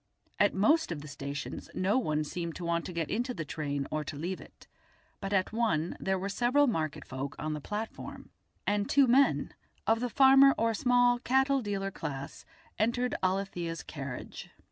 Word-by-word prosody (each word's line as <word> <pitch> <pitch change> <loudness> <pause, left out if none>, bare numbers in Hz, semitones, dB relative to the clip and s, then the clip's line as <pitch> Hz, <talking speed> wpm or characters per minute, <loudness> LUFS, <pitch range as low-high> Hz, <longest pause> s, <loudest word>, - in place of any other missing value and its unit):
At 205 - +4
most 260 - +3
of 155 -3 -4
the 150 - -9
stations 140 0 -6
no 200 +7 +2
one 155 -10 0
seemed 170 +1 -4
to 175 - -6
want 170 0 0
to - - -5
get 170 -3 -3
into 245 +3 -1
the 155 - -4
train 145 -1 -3
or 155 0 -1
to 150 - -5
leave 175 +6 -4
it, - - -16 0.5
but 195 0 -4
at 190 +1 +1
one 210 -8 0
there 190 0 0
were 190 +1 -3
several 245 +8 +3
market 160 - -2
folk 135 +1 -5
on 155 0 -3
the 150 - -5
platform, 210 +7 -6 0.3
and 205 0 0
two 280 -1 +5
men, 265 +3 +3 0.3
of 225 0 +3
the 245 +1 -1
farmer 270 +2 +7
or 230 0 +2
small 245 +2 +3
cattle 265 +2 +2
dealer 195 -2 -2
class, 140 -5 -6 0.3
entered 240 +3 +1
Alethia's 185 -3 -1
carriage. 140 -4 -7
195 Hz, 180 wpm, -30 LUFS, 155-245 Hz, 0.5 s, farmer